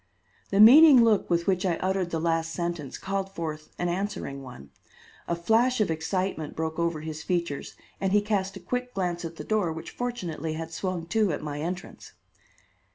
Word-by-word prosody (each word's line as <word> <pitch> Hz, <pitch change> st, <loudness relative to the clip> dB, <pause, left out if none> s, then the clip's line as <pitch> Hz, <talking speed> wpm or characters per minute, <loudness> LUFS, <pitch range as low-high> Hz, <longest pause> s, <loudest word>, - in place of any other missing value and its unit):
The 195 Hz, -, +1 dB
meaning 265 Hz, +3 st, +9 dB
look 220 Hz, -3 st, +3 dB
with 170 Hz, 0 st, +1 dB
which 185 Hz, -2 st, +1 dB
I 180 Hz, -3 st, +1 dB
uttered 190 Hz, 0 st, -1 dB
the 165 Hz, -, -2 dB
last 165 Hz, 0 st, 0 dB
sentence 170 Hz, -5 st, -4 dB
called 195 Hz, 0 st, -3 dB
forth 155 Hz, -2 st, -5 dB
an 175 Hz, -, -1 dB
answering 175 Hz, -6 st, -3 dB
one. 125 Hz, -, -11 dB, 0.6 s
A 170 Hz, -, 0 dB
flash 225 Hz, +8 st, +2 dB
of 210 Hz, -6 st, +2 dB
excitement 160 Hz, -1 st, -2 dB
broke 160 Hz, 0 st, -3 dB
over 170 Hz, -2 st, 0 dB
his 155 Hz, 0 st, -6 dB
features 170 Hz, -5 st, -2 dB, 0.2 s
and 195 Hz, -1 st, 0 dB
he 210 Hz, -, +5 dB
cast 200 Hz, -2 st, -1 dB
a -, -, -9 dB
quick 250 Hz, -1 st, -4 dB
glance 175 Hz, -2 st, -2 dB
at 165 Hz, 0 st, -6 dB
the -, -, -7 dB
door 210 Hz, -6 st, 0 dB
which 160 Hz, 0 st, -7 dB
fortunately 175 Hz, -11 st, -4 dB
had 165 Hz, +1 st, -6 dB
swung 175 Hz, 0 st, -3 dB
to 215 Hz, -1 st, +2 dB
at 145 Hz, -, -4 dB
my 145 Hz, -1 st, -4 dB
entrance. 180 Hz, +3 st, -6 dB
175 Hz, 185 wpm, -27 LUFS, 160-200 Hz, 0.6 s, meaning